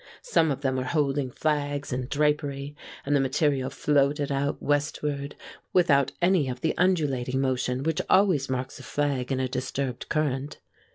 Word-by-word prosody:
Some 165 - +2
of 140 -1 -2
them 130 -2 0
were 130 - -1
holding 140 -2 0
flags 145 0 -1
and 125 0 -3
drapery, 145 -1 0 0.3
and 145 +1 +2
the - - +4
material 135 0 +1
floated 145 0 +1
out 140 +1 -1
westward 145 0 -1 0.4
without 140 -7 +4
any 175 -7 +3
of 125 0 -5
the 160 - 0
undulating 140 -8 +1
motion 130 -1 0
which 160 0 0
always 185 -9 +4
marks 130 0 -3
a - - -10
flag 140 -3 -1
in 130 - 0
a 130 - 0
disturbed 130 0 -3
current. 145 -2 -1
140 Hz, 160 wpm, -26 LUFS, 130-150 Hz, 0.4 s, the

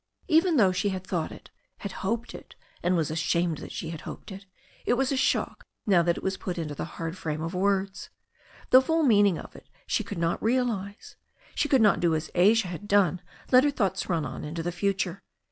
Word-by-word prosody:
Even 330 -1 +4
though 195 -6 +5
she 195 +3 0
had 190 -1 -4
thought 175 -4 -2
it, - - -13 0.3
had 200 - -6
hoped 230 +4 -2
it - - -12 0.3
and 180 +1 +1
was 160 -3 0
ashamed 165 0 0
that - - -9
she 165 - -5
had 160 - -7
hoped - - -9
it, 195 +1 -10 0.4
it 240 - +2
was 265 +2 0
a - - +1
shock 260 - 0 0.2
now 190 -5 +4
that 170 0 +1
it - - -7
was 190 0 -1
put 180 -1 -5
into 155 -3 -3
the - - -4
hard 165 0 -4
frame 155 -4 -4
of 165 +2 -4
words» 195 +1 -1 0.6
The 255 - +9
full 320 +4 +1
meaning 205 - +4
of - - -10
it - - -15 0.2
she - - 0
could 205 - -7
not 165 0 0
realize. 225 -4 -2 0.4
She 295 - 0
could 265 -5 +4
not 210 - +4
do 170 -2 +2
as 155 - -4
Asia 195 +2 +4
had 180 +4 -7
done, 185 -4 +3 0.3
let 255 0 +7
her 290 - +3
thoughts 195 -9 -1
run 165 -4 0
on - - -6
into 160 +2 -4
the 175 - -2
future. 195 0 -1
190 Hz, 220 wpm, -27 LUFS, 170-220 Hz, 0.6 s, The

